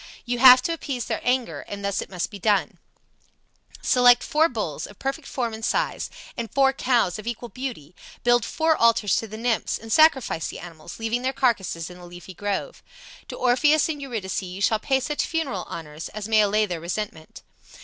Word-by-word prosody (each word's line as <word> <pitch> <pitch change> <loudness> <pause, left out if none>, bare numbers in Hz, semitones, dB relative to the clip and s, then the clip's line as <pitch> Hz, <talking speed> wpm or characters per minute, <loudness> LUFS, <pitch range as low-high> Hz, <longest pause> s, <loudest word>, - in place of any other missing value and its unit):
You 245 0 -2
have 255 0 +9
to 335 - 0
appease 275 -7 -4
their - - -3
anger, 250 -1 0
and 200 0 -6
thus 200 -1 -1
it - - -8
must 180 -3 -3
be 200 - -9
done: 205 0 +1 1.0
Select 245 -1 +5
four 315 +2 +2
bulls, 165 - -4
of 205 - -15
perfect 275 +2 -4
form 235 -4 -3
and 220 0 -8
size, - - -1 0.3
and 235 -2 -5
four 270 -1 +3
cows 245 -7 +1
of 215 - -9
equal 240 0 -4
beauty, 245 - -6 0.3
build 240 -1 +4
four 320 +6 +1
altars 230 -5 +3
to 225 - -2
the 215 +1 -8
nymphs, 230 0 0
and 225 -1 -5
sacrifice 270 - +4
the - - -7
animals, 170 -1 -10
leaving 225 +2 -2
their 260 +1 -1
carcasses 190 -10 0
in 180 - -12
the 175 - -11
leafy 175 +2 -11
grove. 205 +2 -4 0.5
To - - -7
Orpheus 285 +5 +3
and 295 -2 -4
Eurydice 225 -10 -3
you 185 0 -7
shall 215 +2 +2
pay 265 +4 +1
such 295 +3 -1
funeral 285 - -2
honors 155 -1 -7
as 215 -1 -6
may 220 -1 +4
allay 210 +1 +2
their 175 -5 -5
resentment. 170 -2 -6
225 Hz, 195 wpm, -24 LUFS, 195-260 Hz, 1.0 s, have